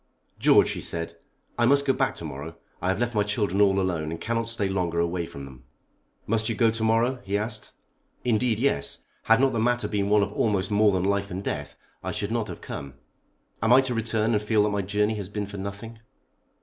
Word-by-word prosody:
"George," - - +6
she - - -3
said, 85 0 -4 0.5
"I 120 - +4
must 140 +1 +4
go 135 - +3
back - - 0
to - - -8
morrow. 75 +5 -7 0.3
I 90 - -1
have 95 - +1
left 120 +1 -1
my 105 - +2
children 105 -1 0
all 100 -1 +4
alone 85 -5 -1
and 85 - -5
cannot 115 0 -1
stay 115 -3 -1
longer 90 -3 -1
away 85 0 -1
from 70 - -9
them." 65 -2 -13 0.6
"Must 110 +1 0
you 115 - -1
go 115 0 +3
to 115 0 -4
morrow?" 115 +3 +2
he 100 +1 -1
asked. 110 +1 -4 0.5
"Indeed, 120 -1 +2
yes. 110 - -1 0.2
Had 115 +1 +5
not 135 0 +3
the 115 - 0
matter 120 +2 +1
been 100 -1 -1
one 105 0 +5
of - - -4
almost 100 -2 0
more 105 0 +4
than 95 -2 0
life 100 +1 0
and 95 +1 -5
death 75 -6 -4 0.3
I - - -3
should 105 +1 -2
not 115 -2 -1
have - - -8
come. 70 -1 -7 0.7
Am 110 +3 +2
I 130 +2 +8
to 130 -2 -1
return 115 0 0
and 105 - +2
feel 105 0 +2
that 105 - +2
my 100 -1 0
journey 105 +2 0
has 100 -2 -5
been 105 0 -3
for 100 0 -8
nothing?" 100 +4 -7
105 Hz, 225 wpm, -26 LUFS, 95-115 Hz, 0.7 s, I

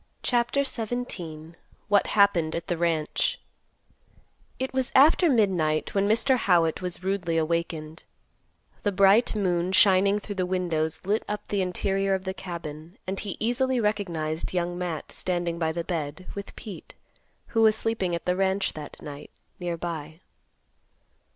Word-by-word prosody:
CHAPTER 245 +3 +2
XVII. 200 - -5 0.3
WHAT 205 -1 +3
HAPPENED 185 -6 +3
AT 170 0 -3
THE 175 - -1
RANCH. 165 -2 0 1.2
It 260 0 -3
was 260 0 0
after 315 +5 +6
midnight 180 - +2
when 200 0 +2
Mr. 235 +5 +3
Howitt 175 -7 +2
was 180 0 -3
rudely 185 -4 0
awakened. 160 -1 -2 0.8
The 205 - +1
bright 200 +5 +4
moon 180 -3 +1
shining 195 +1 +5
through 205 0 -6
the - - +1
windows 160 -4 -1
lit 210 +3 +1
up 210 0 -4
the 200 -2 +1
interior 195 +1 0
of 190 - -4
the 190 0 -3
cabin 170 -2 -8
and 190 +1 -2
he 200 -3 -4
easily 250 +3 +1
recognized 175 -7 -1
Young 175 0 0
Matt 175 -4 -4
standing 175 -2 -1
by 160 -1 +1
the 170 +1 -3
bed, 160 0 -4
with 200 -1 -7
Pete, 205 -4 -9 0.5
who 225 - +1
was 220 -1 +6
sleeping 220 -6 -1
at 170 - -6
the 180 - +1
ranch 190 +1 +1
that 150 -2 -9
night, 145 0 -8 0.3
near 175 -1 -3
by. 160 -2 -5
185 Hz, 150 wpm, -26 LUFS, 165-205 Hz, 1.2 s, after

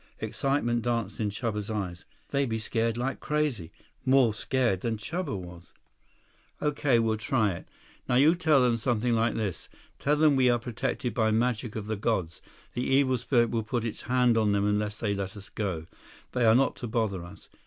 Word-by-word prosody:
Excitement 120 -4 0
danced 115 -1 -2
in 105 -2 0
Chuba's 105 0 -3
eyes. 95 -5 -4 0.2
"They 140 -1 +1
be 110 -1 -1
scared 115 +1 -1
like 130 +2 -2
crazy. 150 - -1 0.3
More 130 -4 +4
scared 115 -4 0
than 115 -2 -1
Chuba 150 - -3
was." 90 -1 -11 0.9
"Okay. 145 -4 +2
We'll 110 -1 +1
try 110 -3 +1
it. 85 - -8 0.4
Now 125 - +3
you 145 +6 +6
tell 160 -6 +3
them 120 -2 +3
something 120 0 0
like 115 0 +1
this. 105 -5 -3 0.3
Tell 145 +1 +2
them 150 -1 +4
we 130 -1 +4
are 120 - +4
protected 120 +1 -3
by 110 -2 +2
magic 115 0 0
of 110 -2 -4
the 110 0 -3
gods. 95 -7 -1 0.3
The 120 - -2
evil 135 -2 +3
spirit 120 -1 +2
will 115 - 0
put 115 +2 -2
its 115 - -4
hand 125 -2 +3
on 105 -2 +2
them 100 0 +1
unless 105 +1 0
they 105 -3 -1
let 100 0 -4
us 100 - -11
go. 95 -7 -3 0.5
They 125 -2 +1
are 110 0 +6
not 135 +2 +3
to 120 - -5
bother 110 -6 -1
us. 90 +2 -13
115 Hz, 190 wpm, -28 LUFS, 105-125 Hz, 0.9 s, you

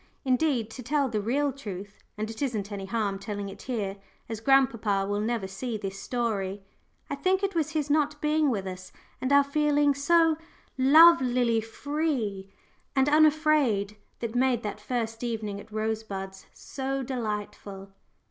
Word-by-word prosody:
Indeed, 255 -4 +1
to 255 - -8
tell 275 +2 0
the 215 -2 -1
real 275 +6 0
truth 205 -6 -8 0.2
and 215 +1 -2
it 220 +3 -8
isn't 220 -7 -2
any 195 -1 -5
harm 200 -2 -1
telling 200 -1 -5
it 195 - -12
in 250 - 0
here, 200 -3 -3 0.3
as 225 -2 -4
grandpapa 230 -6 +3
will 205 +1 -1
never 225 -2 -1
see 220 +4 -4
this 195 -1 -5
story 205 -4 -2 0.5
I - - 0
think 370 +7 +1
it 395 0 0
was 320 -3 0
his 300 -2 -1
not 295 0 +1
being 300 0 +2
with 205 -6 -1
us, 185 -1 -7 0.3
and 260 - -1
our 280 0 +7
feeling 290 0 +2
so 320 +3 +3 0.4
lovelily 260 -5 +6
free 225 -5 -2 0.5
and 270 0 +3
unafraid, 300 -9 +3 0.3
that 230 -2 -3
made 245 -1 +2
that 210 0 -4
first 225 0 -3
evening 215 -4 -3
at 210 - -13
Rosebuds 215 -3 -4
so 270 0 -4
delightful. 210 -5 -5
235 Hz, 155 wpm, -27 LUFS, 205-280 Hz, 0.5 s, our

